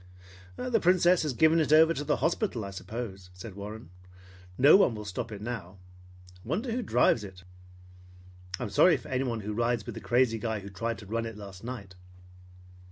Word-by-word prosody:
"The 250 - 0
Princess 180 0 +4
has 150 -4 -1
given 160 +5 +4
it 150 -2 +1
over 160 +1 +6
to 145 - -4
the 150 0 +1
hospital, 165 - -1
I 100 - -7
suppose," 95 -2 -7
said 100 +3 -9
Warren. 100 -2 -9 0.7
"No 140 +3 +7
one 190 - +4
will 105 0 -7
stop 100 +3 -5
it 105 -1 -7
now. 100 -6 -6 0.7
Wonder 200 - -2
who 245 +3 -1
drives 120 - +2
it? 95 -2 -11 1.2
I'm 115 -5 -4
sorry 165 - +5
for 120 - -12
anyone 125 -3 -1
who 105 +1 -4
rides 115 0 0
with - - -6
the - - -8
crazy 120 -2 +2
guy 110 -1 -3
who 100 +1 -10
tried 115 +4 -3
to 105 - -11
run 115 +3 -2
it 115 -2 -8
last 100 -2 -10
night." 115 -6 -7
115 Hz, 185 wpm, -28 LUFS, 105-150 Hz, 1.2 s, No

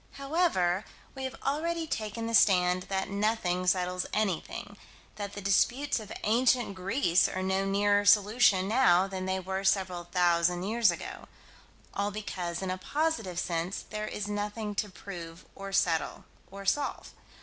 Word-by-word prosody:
However, 275 - +1 0.3
we 265 -1 -5
have 260 - -5
already 330 +4 -1
taken 225 -5 -4
the 230 - -3
stand 180 -4 +4
that 190 0 -2
nothing 200 -3 0
settles 180 0 +1
anything; 205 -6 -2 0.4
that 205 -1 -5
the 205 - -6
disputes 245 +8 +2
of 215 -2 -10
ancient 240 0 +2
Greece 185 -1 +2
are 185 - -3
no 190 +1 0
nearer 205 +1 +2
solution 205 -1 +4
now 195 -6 +4
than 190 -1 -5
they 190 0 0
were 190 +1 -4
several 190 -3 +1
thousand 175 0 +2
years 225 +1 +3
ago 170 - -5 0.7
all 200 +1 -1
because, 185 -4 -4
in 185 - -2
a 185 - -4
positive 255 - -1
sense, 175 +1 -2
there 215 0 -3
is 205 -1 -4
nothing 210 +1 -3
to 205 +1 -2
prove 175 -3 -9
or 195 0 -8
solve 170 -4 0 0.3
or 195 +1 -9
settle. 280 +9 0
195 Hz, 150 wpm, -29 LUFS, 185-215 Hz, 0.7 s, stand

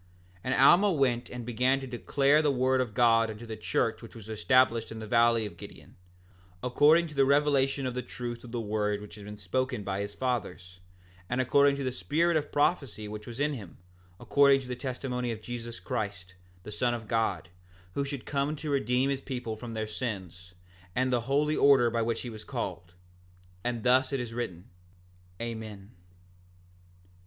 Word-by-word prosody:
6:8 - - -27
And 130 - +1
Alma 175 +9 +6
went 130 -7 +1
and 125 -2 -7
began 125 +3 +2
to 135 - -6
declare 140 +4 +2
the 150 - +2
word 130 -1 +2
of 115 -5 -4
God 115 -1 +4
unto 110 +2 -8
the 110 -1 -6
church 110 - -1
which - - -12
was 110 -1 -11
established 115 +1 +2
in 110 - -6
the 110 - -6
valley 115 0 +3
of 105 - -8
Gideon, - - -12 0.7
according 150 +7 +5
to - - -11
the 140 -1 +4
revelation 140 -1 +2
of 130 - -2
the 125 - -2
truth 120 -1 -6
of 120 - -10
the 120 - -2
word 105 -1 -1
which 105 0 -11
had 105 -1 -10
been 105 0 -8
spoken 125 +4 -2
by 100 0 -2
his 100 0 -5
fathers, 105 -8 -3 0.5
and 125 - -1
according 140 +2 +4
to 140 - -4
the 130 - -1
spirit 165 +7 +1
of 150 -1 -1
prophecy 140 -8 0
which 105 0 -8
was 120 +1 -8
in 145 +1 +1
him, 100 - -9 0.4
according 140 -1 +4
to 130 - -10
the 125 - -3
testimony 125 -1 -3
of 110 - -5
Jesus 120 0 -7
Christ, 100 -8 -4 0.3
the 105 - -8
Son 120 +3 0
of 110 -2 -8
God, 105 -6 0 0.4
who 140 - -1
should 140 -2 -5
come 140 +1 -1
to 150 0 -5
redeem 130 0 +1
his 135 -1 -2
people 125 -5 -4
from 115 +1 -8
their 110 0 -2
sins, 95 -6 -6 0.4
and 130 0 +1
the 120 - +2
holy 150 +2 +2
order 135 -4 +5
by 115 0 0
which 115 0 -1
he 125 - -6
was 110 -1 -9
called. 85 0 -5 0.7
And 120 -2 -2
thus 130 +2 +4
it 135 - -1
is 120 -2 -5
written. 95 -8 -5 0.7
Amen. 110 -3 -6
120 Hz, 190 wpm, -29 LUFS, 110-135 Hz, 0.7 s, Alma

